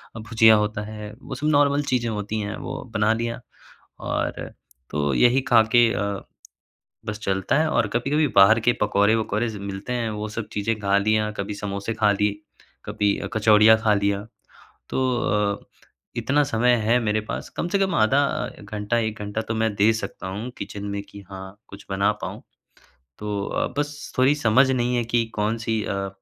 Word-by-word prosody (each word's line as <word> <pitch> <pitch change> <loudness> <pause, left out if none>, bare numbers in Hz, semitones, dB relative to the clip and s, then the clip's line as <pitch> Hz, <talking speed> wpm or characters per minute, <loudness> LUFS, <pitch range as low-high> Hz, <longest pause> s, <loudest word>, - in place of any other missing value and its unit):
और 110 - -6
भुजिया 110 0 +5
होता 105 0 -1
है 105 -1 -8
वो 135 - -7
सब 145 +4 -2
नॉर्मल 145 -1 +3
चीज़ें 120 -2 +1
होतीं 105 0 -3
हैं 105 +1 -4
वो 135 - -6
बना 105 0 +2
लिया। 115 +1 -3 0.6
और, - - -3 0.4
तो 75 -2 -1
यही 125 - +4
खा 115 -2 +7
के 120 -1 +6
अ, 100 -1 -2 0.9
बस 105 0 -4
चलता 95 +3 0
है 160 - +2
और 115 -7 +1
कभी-कभी 140 +8 +1
बाहर 100 +3 +7
के 120 +2 +3
पकौड़े-वकौड़े 105 +2 +2
सब 105 - -7
मिलते 100 +5 -5
हैं 115 -2 -1
वो 105 0 -4
सब 110 0 -5
चीजें 105 +2 -1
खा 100 -1 +2
लिया, 105 +1 +1
कभी 100 0 -4
समोसे 100 +1 -4
खा 105 -2 +3
लिए, 105 0 0 0.4
कभी 100 -1 0
अ - - -4
कचौड़ियाँ 110 0 +6
खा 110 -2 +3
लिया। 100 0 0 0.7
तो - - -1 0.2
अ, 105 -2 0 0.6
इतना 135 +6 +2
समय 120 -1 +2
है 115 +3 +3
मेरे 110 0 +1
पास - - -4
कम 175 - -1
से 200 +3 0
कम 195 -1 +1
आधा 110 +6 +3
अ, - - -4
घंटा 105 +2 -2
1 110 -2 -2
घंटा 105 +1 -3
तो 110 - -4
मैं 110 -1 0
दे 105 +3 +4
सकता 110 - -6
हूँ 105 +6 -5
किचन 100 0 -6
में 100 0 -3
कि 100 - -11
हाँ 95 +1 -9
कुछ 100 - -12
बना 100 +2 +2
पाऊँ। - - -6 0.8
तो 105 -1 -3
अ, - - -1
बस 145 0 -4
थोड़ी 130 +3 +5
समझ 130 -1 +3
नहीं 125 -1 +1
है 120 - 0
कि 115 0 +1
कौन-सी 110 +1 -1
अ, 100 0 -2
110 Hz, 185 wpm, -23 LUFS, 105-120 Hz, 0.9 s, खा